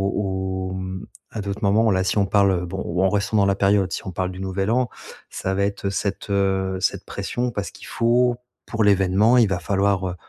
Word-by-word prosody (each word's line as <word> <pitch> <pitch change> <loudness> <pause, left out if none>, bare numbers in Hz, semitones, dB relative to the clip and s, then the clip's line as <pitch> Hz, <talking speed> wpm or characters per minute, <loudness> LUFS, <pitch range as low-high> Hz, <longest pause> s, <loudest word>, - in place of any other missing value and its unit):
au 95 -1 -2
mmh, 95 0 -5 0.2
à 110 - -5
d'autres 100 0 -4
moments 110 +2 +3
là 95 -1 +2
si 95 - 0
on 100 - +3
parle. 95 -2 +2
Bon 95 +2 -5
ou 90 +2 -1
en 95 - +4
restant 105 +1 0
dans 100 - +4
la 100 - +3
période 100 -1 +2
si - - -3
on - - -3
parle 90 +1 -2
du 90 - -9
Nouvel 95 +2 -1
An 125 +1 +1 0.4
ça 95 - -3
va 100 +1 +1
être 100 0 -2
cette, 100 0 -3
heu, 95 -1 0
cette - - -1
pression 125 0 -3
parce 100 -3 -4
qu'il - - -13
faut 120 +1 +2 0.3
pour 115 -1 -1
l'événement 100 +4 +4
il 115 - +5
va 95 -2 -1
falloir 95 0 0
100 Hz, 215 wpm, -22 LUFS, 95-105 Hz, 0.4 s, il